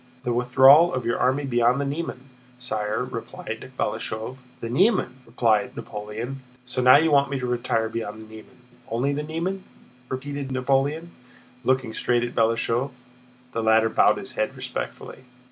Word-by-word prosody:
"The 120 Hz, -, -1 dB
withdrawal 130 Hz, +7 st, +6 dB
of 130 Hz, -2 st, -3 dB
your 120 Hz, -, 0 dB
army 130 Hz, +3 st, +1 dB
beyond 120 Hz, 0 st, +2 dB
the 140 Hz, -, -1 dB
Niemen, 140 Hz, -2 st, -4 dB, 0.4 s
sire," 110 Hz, -4 st, -2 dB
replied -, -, -7 dB
Balashëv. 110 Hz, +4 st, -3 dB, 0.2 s
"The 115 Hz, -, -5 dB
Niemen?" 165 Hz, -, +2 dB
repeated 115 Hz, -3 st, +1 dB
Napoleon. 110 Hz, +6 st, -6 dB, 0.2 s
"So 125 Hz, 0 st, -2 dB
now 125 Hz, +2 st, +8 dB
you 160 Hz, +1 st, +2 dB
want 140 Hz, -1 st, +4 dB
me 140 Hz, -, -2 dB
to 125 Hz, -, -3 dB
retire 120 Hz, -2 st, 0 dB
beyond 110 Hz, -1 st, -5 dB
the 110 Hz, -, -11 dB
Niemen—only 120 Hz, +3 st, -5 dB
the 145 Hz, -, -2 dB
Niemen?" 170 Hz, +5 st, -3 dB, 0.5 s
repeated 140 Hz, +1 st, -5 dB
Napoleon, 140 Hz, +6 st, 0 dB, 0.5 s
looking 130 Hz, -2 st, +1 dB
straight 120 Hz, +1 st, +1 dB
at 120 Hz, -, -4 dB
Balashëv. 115 Hz, +3 st, +1 dB, 0.6 s
The 115 Hz, -, -2 dB
latter 110 Hz, 0 st, +4 dB
bowed -, -, +4 dB
his -, -, -6 dB
head -, -, -2 dB
respectfully. -, -, -6 dB
125 Hz, 150 wpm, -24 LUFS, 115-140 Hz, 0.6 s, now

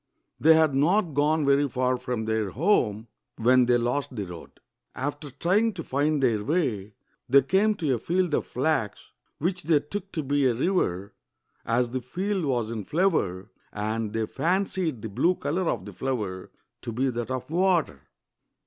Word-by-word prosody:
They 160 Hz, +1 st, +6 dB
had 160 Hz, -3 st, +3 dB
not 165 Hz, +5 st, +2 dB
gone 150 Hz, +2 st, +2 dB
very 140 Hz, +1 st, +3 dB
far 130 Hz, +1 st, 0 dB
from 125 Hz, -3 st, -3 dB
their 110 Hz, -2 st, 0 dB
home 115 Hz, -, +1 dB, 0.3 s
when 125 Hz, +2 st, +4 dB
they 120 Hz, 0 st, +4 dB
lost 125 Hz, +3 st, -2 dB
the 105 Hz, -3 st, -3 dB
road. 90 Hz, -2 st, -11 dB, 0.4 s
After 145 Hz, +2 st, -4 dB
trying 190 Hz, -, +1 dB
to 165 Hz, -, -5 dB
find 145 Hz, +1 st, 0 dB
their 110 Hz, -5 st, +2 dB
way, 115 Hz, -, -1 dB, 0.3 s
they 135 Hz, +1 st, +6 dB
came 200 Hz, +9 st, +2 dB
to 155 Hz, -8 st, 0 dB
a 120 Hz, -, -1 dB
field 175 Hz, +4 st, 0 dB
of -, -, 0 dB
flax, 130 Hz, -5 st, -2 dB, 0.3 s
which 180 Hz, +3 st, -2 dB
they 160 Hz, -2 st, +3 dB
took 195 Hz, +6 st, -6 dB
to 155 Hz, -, -2 dB
be 140 Hz, 0 st, +2 dB
a 120 Hz, -, +1 dB
river, 110 Hz, -, -1 dB, 0.5 s
as 120 Hz, +1 st, +1 dB
the 130 Hz, 0 st, -2 dB
field 185 Hz, -, -2 dB
was 120 Hz, -5 st, -1 dB
in 110 Hz, -3 st, -4 dB
flower, 115 Hz, -, 0 dB, 0.2 s
and 110 Hz, +1 st, -3 dB
they 110 Hz, 0 st, -1 dB
fancied 175 Hz, -, -1 dB
the 110 Hz, -, -4 dB
blue 175 Hz, -, +2 dB
color 165 Hz, +5 st, -1 dB
of 90 Hz, -, -2 dB
the 105 Hz, -, -9 dB
flower 105 Hz, -7 st, -3 dB, 0.3 s
to -, -, -5 dB
be 130 Hz, +4 st, 0 dB
that 120 Hz, 0 st, -4 dB
of 130 Hz, -1 st, -3 dB
water. 170 Hz, -, +1 dB
135 Hz, 175 wpm, -26 LUFS, 115-165 Hz, 0.5 s, They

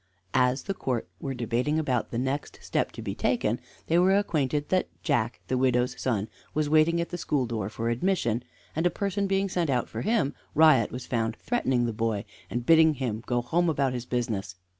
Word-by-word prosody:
As 125 Hz, +1 st, +2 dB
the 195 Hz, -, -2 dB
court 125 Hz, -, -2 dB
were 135 Hz, -1 st, -4 dB
debating 125 Hz, +5 st, 0 dB
about 130 Hz, -7 st, 0 dB
the 115 Hz, -, -4 dB
next 135 Hz, +4 st, -2 dB
step -, -, 0 dB
to -, -, -7 dB
be -, -, -3 dB
taken -, -, 0 dB, 0.3 s
they 165 Hz, +2 st, +3 dB
were 190 Hz, +2 st, +5 dB
acquainted 150 Hz, -7 st, 0 dB
that 185 Hz, -1 st, +2 dB, 0.2 s
Jack, 120 Hz, -7 st, 0 dB
the 130 Hz, -, 0 dB
widow's 125 Hz, -1 st, +2 dB
son, 110 Hz, -5 st, 0 dB, 0.3 s
was 155 Hz, -1 st, +1 dB
waiting 155 Hz, +3 st, +4 dB
at 170 Hz, -, -2 dB
the 175 Hz, -, -5 dB
school 145 Hz, -5 st, 0 dB
door 110 Hz, -4 st, -3 dB
for 115 Hz, +1 st, -3 dB
admission; 120 Hz, -, 0 dB, 0.3 s
and 160 Hz, +3 st, +2 dB
a -, -, +3 dB
person 200 Hz, +1 st, -1 dB
being 195 Hz, 0 st, +1 dB
sent 175 Hz, -4 st, -1 dB
out 125 Hz, -3 st, +1 dB
for -, -, -5 dB
him, 215 Hz, -9 st, +1 dB, 0.2 s
Riot 150 Hz, -8 st, +6 dB
was 125 Hz, +1 st, -6 dB
found 115 Hz, -2 st, -1 dB
threatening 130 Hz, -, 0 dB
the 115 Hz, -, -2 dB
boy, 110 Hz, -2 st, -1 dB, 0.2 s
and 120 Hz, 0 st, -3 dB
bidding 160 Hz, 0 st, +6 dB
him 120 Hz, -5 st, -2 dB
go 120 Hz, -1 st, +1 dB
home 170 Hz, +7 st, +2 dB
about 140 Hz, -4 st, +1 dB
his 125 Hz, -1 st, -5 dB
business. 110 Hz, -6 st, -2 dB
130 Hz, 205 wpm, -27 LUFS, 120-160 Hz, 0.3 s, Riot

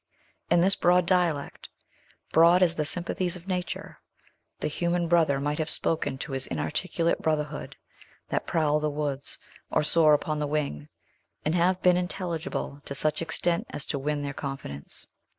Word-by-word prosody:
In 175 Hz, 0 st, +5 dB
this 190 Hz, +2 st, +4 dB
broad 180 Hz, 0 st, +4 dB
dialect 170 Hz, -6 st, 0 dB, 0.6 s
broad 170 Hz, +3 st, +6 dB
as 170 Hz, -2 st, +3 dB
the 155 Hz, -3 st, -1 dB
sympathies 175 Hz, +2 st, -1 dB
of 180 Hz, +1 st, -11 dB
nature 180 Hz, -2 st, -4 dB, 0.6 s
the -, -, -1 dB
human 170 Hz, +3 st, 0 dB
brother 160 Hz, -5 st, +3 dB
might 145 Hz, +2 st, -1 dB
have 155 Hz, 0 st, -1 dB
spoken 145 Hz, -6 st, 0 dB
to 135 Hz, -, -6 dB
his 135 Hz, -1 st, 0 dB
inarticulate 165 Hz, -, -1 dB
brotherhood 150 Hz, -1 st, -2 dB, 0.5 s
that -, -, -1 dB
prowl 150 Hz, -2 st, +2 dB
the 150 Hz, 0 st, 0 dB
woods, 145 Hz, -2 st, -3 dB, 0.3 s
or -, -, +2 dB
soar 155 Hz, 0 st, +6 dB
upon 150 Hz, +1 st, -2 dB
the 150 Hz, -, -1 dB
wing, 145 Hz, -, -2 dB, 0.6 s
and 155 Hz, -, +1 dB
have 180 Hz, +2 st, +2 dB
been 180 Hz, -1 st, +5 dB
intelligible 180 Hz, -5 st, -3 dB
to 140 Hz, -, -5 dB
such 155 Hz, +2 st, 0 dB
extent 170 Hz, +1 st, -1 dB
as 140 Hz, -, -6 dB
to 140 Hz, -, -2 dB
win 145 Hz, +1 st, -1 dB
their 140 Hz, -1 st, -3 dB
confidence. 135 Hz, -, -6 dB
155 Hz, 160 wpm, -27 LUFS, 145-175 Hz, 0.6 s, broad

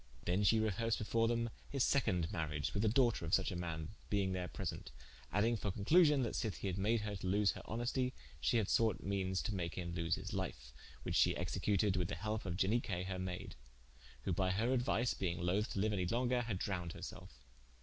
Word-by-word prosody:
Then 90 Hz, +4 st, +2 dB
she 110 Hz, +3 st, +5 dB
rehersed 110 Hz, +1 st, +1 dB
before 115 Hz, +2 st, +1 dB
them 115 Hz, 0 st, 0 dB, 0.2 s
his 135 Hz, -3 st, +1 dB
seconde 95 Hz, -12 st, +2 dB
mariage 75 Hz, -3 st, -2 dB
with 100 Hz, -, 0 dB
the 110 Hz, -, +3 dB
doughter 120 Hz, -3 st, +3 dB
of 85 Hz, +1 st, +3 dB
such 95 Hz, -, 0 dB
a -, -, -4 dB
man, 80 Hz, -2 st, -4 dB, 0.2 s
being 100 Hz, -2 st, +1 dB
there 90 Hz, -1 st, -2 dB
present, 70 Hz, -, -5 dB, 0.4 s
adding 110 Hz, +5 st, +2 dB
for 105 Hz, -1 st, -2 dB
conclusion, 145 Hz, -, +4 dB
that 115 Hz, -, -2 dB
sith 110 Hz, -4 st, -2 dB
he -, -, -6 dB
had 95 Hz, 0 st, -1 dB
made 110 Hz, +3 st, +2 dB
her 105 Hz, -1 st, -3 dB
to 95 Hz, -1 st, -4 dB
lose 100 Hz, +2 st, +3 dB
her -, -, -8 dB
honestie, 120 Hz, +3 st, -1 dB, 0.3 s
shee 70 Hz, -, +2 dB
had 110 Hz, -4 st, +1 dB
sought 110 Hz, -3 st, +2 dB
meanes 95 Hz, -1 st, -1 dB
to 105 Hz, -, -2 dB
make 85 Hz, -3 st, -3 dB
him 85 Hz, -2 st, -4 dB
to 85 Hz, -, -2 dB
loose 85 Hz, -1 st, +1 dB
his -, -, -6 dB
life: -, -, -4 dB, 0.3 s
which -, -, -3 dB
she -, -, +4 dB
executed 100 Hz, -1 st, +1 dB
with 90 Hz, -2 st, +1 dB
the -, -, -3 dB
helpe 105 Hz, +3 st, -3 dB
of 85 Hz, -, -2 dB
Ianique 95 Hz, -3 st, 0 dB
her 90 Hz, -1 st, -3 dB
mayde: 90 Hz, -1 st, -4 dB, 0.7 s
who 90 Hz, -, 0 dB
by 95 Hz, +2 st, +1 dB
her 110 Hz, +7 st, +1 dB
aduise 120 Hz, -1 st, +1 dB
being 90 Hz, -3 st, -2 dB
loth 95 Hz, +6 st, 0 dB
to -, -, -2 dB
liue 105 Hz, +2 st, +2 dB
any 90 Hz, -3 st, 0 dB
longer, 125 Hz, +4 st, +1 dB
had 115 Hz, -5 st, -2 dB
drowned 90 Hz, -3 st, -3 dB
her -, -, -9 dB
selfe. -, -, -9 dB
100 Hz, 220 wpm, -37 LUFS, 90-115 Hz, 0.7 s, she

